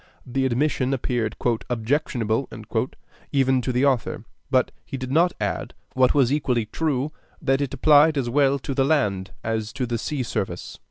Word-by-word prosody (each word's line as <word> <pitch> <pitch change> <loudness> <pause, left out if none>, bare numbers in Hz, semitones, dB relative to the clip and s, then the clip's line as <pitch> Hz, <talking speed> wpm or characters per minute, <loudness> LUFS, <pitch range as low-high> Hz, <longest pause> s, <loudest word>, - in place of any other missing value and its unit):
The 130 +1 0
admission 130 +1 +1
appeared 120 -4 -1 0.3
"objectionable" 120 -1 0 0.8
even 130 -2 +3
to 130 - -1
the 125 +3 +2
author; 130 -4 0 0.2
but - - +2
he 135 - -6
did 130 0 -5
not 170 +5 +4
add, - - -3 0.2
what 130 +1 +3
was 135 -2 +4
equally 125 -6 +1
true, 145 +3 -1 0.3
that 135 +1 +1
it 140 -3 -2
applied 150 0 +5
as 130 -3 0
well 140 +2 +3
to 135 0 -4
the 135 - +2
land 105 -11 +1
as 110 -1 -2
to 130 - -2
the 120 -1 -2
sea 140 +2 -2
service. 95 -6 -4
130 Hz, 165 wpm, -24 LUFS, 120-140 Hz, 0.8 s, applied